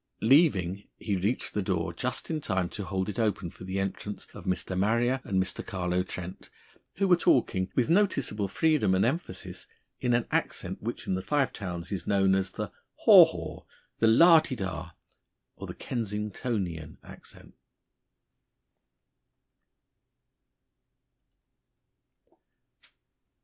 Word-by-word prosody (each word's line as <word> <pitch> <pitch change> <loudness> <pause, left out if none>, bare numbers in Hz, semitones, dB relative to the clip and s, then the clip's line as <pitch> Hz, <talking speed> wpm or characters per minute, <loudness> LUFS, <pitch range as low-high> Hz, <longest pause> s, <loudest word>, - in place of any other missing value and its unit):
Leaving, 105 - +3
he 105 -3 -2
reached 100 +7 -1
the 105 - 0
door 90 -2 -2
just 125 - -2
in 155 -1 -2
time 95 -8 -1
to 100 - -6
hold 95 0 -2
it 105 +3 -4
open 100 -6 -1
for 90 - -12
the 95 +1 -3
entrance 95 +1 -4
of - - -11
Mr. 95 0 -1
Marrier 115 +7 +1
and 95 -1 -1
Mr. 95 0 -1
Carlo 90 -1 -1
Trent, 90 0 -7 0.5
who 195 0 +1
were 180 - +6
talking, 95 - +2
with 125 - +2
noticeable 145 - +1
freedom 135 -5 +2
and 95 - +2
emphasis, 160 +9 -4 0.3
in 120 -1 +1
an 120 - +1
accent - - -2
which - - -5
in - - -1
the 95 - -1
Five 140 +3 0
Towns 90 -3 -5
is 95 -4 -4
known 95 -2 +3
as 95 0 0
the - - -5 0.3
"haw - - +10
haw," - - -7 0.4
the 115 - +4
"lah 165 +9 +7
di 135 - -4
dah," 90 -5 -5 0.6
or - - -8
the - - -7
"Kensingtonian" 105 - -4
accent. - - -13
100 Hz, 135 wpm, -28 LUFS, 95-125 Hz, 0.6 s, haw